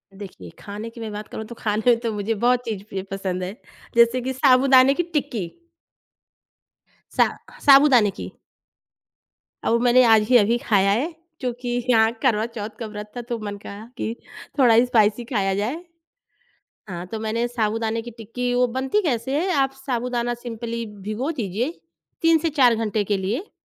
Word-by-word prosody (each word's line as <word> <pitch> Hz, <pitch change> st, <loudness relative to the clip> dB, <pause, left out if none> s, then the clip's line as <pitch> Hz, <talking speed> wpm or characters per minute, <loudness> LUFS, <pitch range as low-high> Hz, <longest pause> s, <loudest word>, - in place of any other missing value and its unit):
देखिए, 185 Hz, -, -10 dB
खाने 210 Hz, +3 st, -7 dB
की 230 Hz, 0 st, -12 dB
मैं 220 Hz, -1 st, -5 dB
बात 210 Hz, +1 st, -7 dB
करूँ 220 Hz, -, -7 dB
तो 235 Hz, -, -10 dB
खाने 220 Hz, +3 st, +2 dB
तो 230 Hz, -, -1 dB
मुझे 210 Hz, +2 st, -1 dB
बहुत 245 Hz, +3 st, +2 dB
चीज़ 210 Hz, -4 st, -4 dB
प्रिय 190 Hz, -1 st, -4 dB
पसंद 185 Hz, -2 st, -3 dB
है, 190 Hz, +4 st, -5 dB, 0.4 s
जैसे 235 Hz, +2 st, +4 dB
कि 260 Hz, +2 st, -3 dB
साबूदाने 260 Hz, 0 st, +5 dB
की 350 Hz, -, -1 dB
टिक्की। 230 Hz, -, -2 dB, 1.7 s
सा -, -, +5 dB, 0.4 s
साबूदाने 270 Hz, -7 st, +6 dB
की। -, -, -5 dB, 1.4 s
अब 235 Hz, +1 st, +2 dB
मैंने 250 Hz, +1 st, +5 dB
आज 220 Hz, -2 st, +6 dB
ही 250 Hz, -, +7 dB
अभी 230 Hz, +2 st, +3 dB
खाया 200 Hz, -4 st, +2 dB
है। 285 Hz, +11 st, 0 dB, 0.3 s
क्योंकि 245 Hz, -1 st, -4 dB, 0.2 s
यहाँ 225 Hz, -1 st, +4 dB
करवा 225 Hz, -5 st, +2 dB
चौथ 220 Hz, -2 st, -6 dB
का 230 Hz, -, -4 dB
व्रत 210 Hz, 0 st, -8 dB
था, -, -, -3 dB
तो 240 Hz, 0 st, -4 dB
मन 205 Hz, -1 st, -5 dB
कहा 200 Hz, +2 st, -10 dB
कि 225 Hz, -, -3 dB, 0.4 s
थोड़ा 235 Hz, -3 st, +6 dB
स्पाइसी 220 Hz, -1 st, +2 dB
खाया 195 Hz, -2 st, +1 dB
जाए। 250 Hz, -, -3 dB, 1.1 s
हाँ, 175 Hz, 0 st, -6 dB
तो 220 Hz, +4 st, -6 dB
मैंने 225 Hz, +2 st, -1 dB
साबूदाने 225 Hz, -1 st, -1 dB
की 240 Hz, -, -8 dB
टिक्की 235 Hz, +2 st, -4 dB
वो 250 Hz, 0 st, +3 dB
बनती 265 Hz, +11 st, +1 dB
कैसे 270 Hz, -1 st, -1 dB
है? 375 Hz, +1 st, -1 dB
आप 270 Hz, -2 st, +1 dB
साबूदाना 240 Hz, -1 st, -1 dB
सिम्पली 235 Hz, -1 st, -5 dB
भिगो 210 Hz, +7 st, -4 dB
दीजिए, 230 Hz, -, -2 dB, 0.5 s
3 330 Hz, 0 st, +5 dB
से 325 Hz, 0 st, -1 dB
4 255 Hz, -5 st, +4 dB
घंटे 215 Hz, -2 st, -1 dB
के 205 Hz, 0 st, 0 dB
लिए 215 Hz, -, -3 dB
230 Hz, 165 wpm, -23 LUFS, 210-250 Hz, 1.7 s, ही